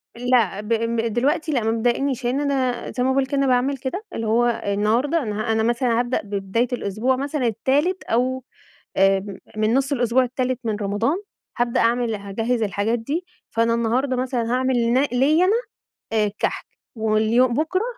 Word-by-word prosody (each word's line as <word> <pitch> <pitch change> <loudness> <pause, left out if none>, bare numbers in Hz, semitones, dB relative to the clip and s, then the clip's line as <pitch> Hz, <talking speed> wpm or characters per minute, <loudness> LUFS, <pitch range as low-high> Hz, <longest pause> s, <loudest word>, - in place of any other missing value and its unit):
لأ، 235 -5 +1
ب 210 - -10 0.5
دلوقتي 290 +6 +1
لأ 250 -6 0
مبتضايقنيش 240 +3 0
لإن 250 +3 +1
أنا 265 -4 -1
زي 250 - -1
ما 260 - +2
باقول 265 0 +2
كده 280 +1 -2
أنا 275 0 +2
باعمل 260 +2 +2
كده، 270 - -4
اللي 225 - -3
هو 235 +2 +3 0.2
النهارده 225 +10 +1
أنا 215 0 -2
أنا 220 0 +1
مثلًا 235 0 +1
هابدأ 245 +1 0
ببداية 200 +3 -1
الأسبوع 235 +3 0
مثلًا 275 -1 -1
التالت 290 - 0
أو 255 +2 0 0.5
آآ 195 0 +3 0.3
من 215 +1 +2
نُص 270 +2 +1
الأسبوع 250 -1 +2
التالت 255 0 -2
من 220 -2 -1
رمضان، 210 - 0 0.4
هابدأ 240 -1 +1
أعمل 235 -1 +1
هاجهّز 225 +4 -2
الحاجات 210 +3 0
دي، 295 +10 -3 0.2
فأنا 230 0 +1
النهارده 240 +4 0
مثلًا 250 -2 -1
هاعمل 260 +1 +1 0.2
ن 260 - +4
ليّا 295 +8 +3
أنا 435 +5 +2 0.7
الكحك، 205 0 -3 0.3
واليوم 220 +2 +2
بُكرة 320 - 0
245 Hz, 160 wpm, -22 LUFS, 225-265 Hz, 0.7 s, ن